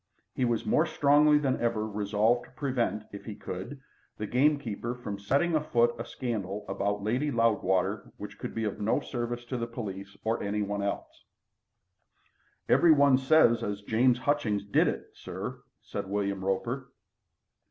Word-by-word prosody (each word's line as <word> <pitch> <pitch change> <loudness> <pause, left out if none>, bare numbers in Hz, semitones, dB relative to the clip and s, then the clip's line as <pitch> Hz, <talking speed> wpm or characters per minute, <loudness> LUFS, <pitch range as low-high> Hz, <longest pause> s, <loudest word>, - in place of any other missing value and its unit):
He 130 - 0
was 120 -2 0
more 160 +2 +3
strongly 150 0 +5
than 140 -3 0
ever 115 -2 0
resolved 105 +3 +1
to - - -19
prevent, 125 -6 -1
if 100 - -8
he 110 - -6
could, 95 +12 -7 0.4
the 105 - -3
gamekeeper 125 -2 +1
from 105 -5 -6
setting 140 +12 +1
afoot 120 -6 +2
a 115 - -4
scandal 105 -5 -4
about 100 +1 -1
Lady 125 +8 0
Loudwater 110 -7 +1
which - - -9
could - - -6
be 115 - -1
of 105 -1 -3
no 110 +7 +2
service 120 -3 -4
to 125 +1 -3
the 115 0 -2
police 100 -5 -7
or 115 +1 0
any 105 +1 -1
one 100 0 -2
else. 100 0 -4 1.4
"Everybody 140 -5 +6
says 130 -3 +4
as 105 0 -3
James 120 +4 +3
Hutchings 120 -7 0
did 100 - +3
it, - - -3
sir," - - -7 0.2
said 95 - -5
William 100 -1 -1
Roper. 120 +7 -2
115 Hz, 155 wpm, -29 LUFS, 100-130 Hz, 1.4 s, Everybody